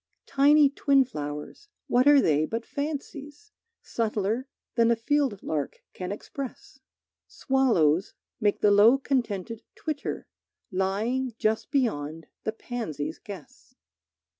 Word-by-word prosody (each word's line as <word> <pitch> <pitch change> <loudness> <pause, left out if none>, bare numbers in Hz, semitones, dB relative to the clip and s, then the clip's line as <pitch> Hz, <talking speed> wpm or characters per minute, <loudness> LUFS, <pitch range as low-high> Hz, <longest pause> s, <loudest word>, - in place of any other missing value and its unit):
Tiny 290 +2 +5
twin 275 -1 +3
flowers, 150 - -7 0.2
what 250 +3 +3
are 290 -1 +8
they 155 - +3
but 230 +1 -4
fancies, 290 +5 -6 0.3
Subtler 225 +2 -1 0.3
than 230 -1 +3
a 235 - +4
field 255 -2 0
lark 150 -3 -3
can 180 0 -5
express? 265 +5 -7 0.5
Swallows 200 - +2 0.2
make 205 -3 +1
the 205 - +5
low 215 +6 +7
contented 230 -6 -2
twitter 305 -3 -4 0.5
Lying 215 +7 -1
just 220 0 0
beyond 165 - -1 0.2
the 220 - 0
pansies' 170 - -5
guess. 190 -8 -12
230 Hz, 115 wpm, -27 LUFS, 195-275 Hz, 0.5 s, are